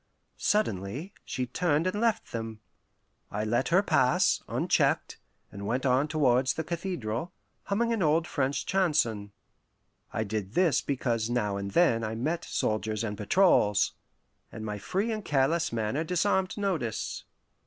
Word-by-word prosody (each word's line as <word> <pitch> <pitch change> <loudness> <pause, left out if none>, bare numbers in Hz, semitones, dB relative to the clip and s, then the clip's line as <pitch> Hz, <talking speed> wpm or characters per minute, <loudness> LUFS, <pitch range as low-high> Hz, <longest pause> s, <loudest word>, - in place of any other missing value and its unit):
Suddenly 140 - -1
she 130 - -3
turned 155 +5 0
and 205 +3 -1
left 225 -1 0
them. 115 -1 -5 0.7
I 105 +1 -2
let 120 +4 +1
her 185 +4 +4
pass, 130 -9 +3
unchecked, - - +1 0.3
and 100 0 -6
went 125 +5 -1
on 130 +3 +3
towards 130 -4 +2
the 160 - -2
cathedral, 170 - -3 0.3
humming 230 +4 +1
an 225 - -1
old 160 0 +3
French 140 -3 -1
chanson. 130 - +1 0.8
I 110 - -1
did 105 -1 -4
this 180 -4 +3
because 120 -5 -1
now 105 -5 0
and 100 0 -3
then 115 - +3
I 110 +1 -3
met 155 +9 -2
soldiers 110 0 -1
and 105 -2 -3
patrols, 105 - +3 0.6
and 110 -1 -7
my 105 -1 -4
free 195 - -1
and 215 -1 -3
careless 155 +3 +1
manner 115 +6 -1
disarmed 185 +3 0
notice. 170 - -2
130 Hz, 145 wpm, -28 LUFS, 110-175 Hz, 0.8 s, her